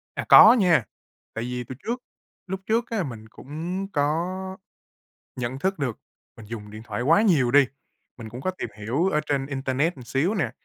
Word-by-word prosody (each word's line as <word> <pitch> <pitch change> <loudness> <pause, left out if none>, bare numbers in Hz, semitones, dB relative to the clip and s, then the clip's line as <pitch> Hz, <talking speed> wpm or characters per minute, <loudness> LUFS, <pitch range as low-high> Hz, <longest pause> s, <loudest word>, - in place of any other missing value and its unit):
À, - - -3
có 220 - +10
nha, 180 - +4 0.5
tại 115 - -4
vì 125 0 -4
từ 130 +2 -8
trước 245 +2 -3 0.4
lúc 190 +1 -4
trước 230 +2 0
á 220 -5 -1
mình 115 -7 -8
cũng 170 - -5
có 150 +4 +1 1.1
nhận 125 +1 -3
thức 190 +5 -1
được 130 -6 -2 0.4
mình 115 - -12
dùng 105 -2 -8
điện 110 +1 -9
thoại 110 0 -4
quá 165 +10 +4
nhiều 155 - +3
đi. 140 +1 +6 0.5
Mình 115 -2 -9
cũng 120 +3 -8
có 185 - -1
tìm 185 - -6
hiểu 125 - 0
ở 155 -5 +1
trên 140 -2 0
internet 135 +4 -1
một 130 - -12
xíu 140 - 0
nè, 160 - 0
140 Hz, 190 wpm, -25 LUFS, 120-180 Hz, 1.1 s, có